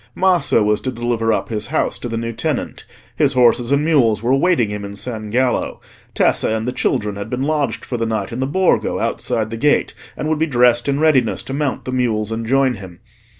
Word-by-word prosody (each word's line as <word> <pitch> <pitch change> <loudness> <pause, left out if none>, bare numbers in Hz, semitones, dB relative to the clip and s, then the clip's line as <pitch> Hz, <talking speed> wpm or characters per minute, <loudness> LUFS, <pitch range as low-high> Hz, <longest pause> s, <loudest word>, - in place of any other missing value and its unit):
Maso 170 - +3
was 105 0 +1
to 130 - -2
deliver 120 -1 -1
up - - -1
his 110 -2 -3
house 155 +5 -1
to 120 - -5
the 115 - -3
new 115 0 -3
tenant; 145 +5 -3 0.3
his - - +2
horses 120 0 +3
and 140 +1 +2
mules 120 -9 +2
were 120 - +1
awaiting 135 - +2
him 105 0 -5
in 100 0 -7
San 110 0 -5
Gallo; 125 +3 0 0.4
Tessa - - +2
and 110 +1 -1
the - - 0
children 105 -5 -1
had 100 +2 -6
been 125 +2 -2
lodged 145 -5 -1
for 125 - -3
the 115 0 -1
night 110 -3 -2
in 115 - -5
the 130 - 0
Borgo 185 +6 +1
outside 110 -1 -2
the 115 - -4
gate, 145 +5 +2 0.2
and 150 - -3
would 155 -1 0
be 160 - +1
dressed 120 -3 +3
in 140 +1 0
readiness 145 -7 +2
to 135 - -6
mount 140 -1 -2
the 130 - -3
mules 115 -4 0
and 115 0 -3
join 135 0 +3
him. 95 -3 -11
120 Hz, 225 wpm, -19 LUFS, 110-140 Hz, 0.4 s, Maso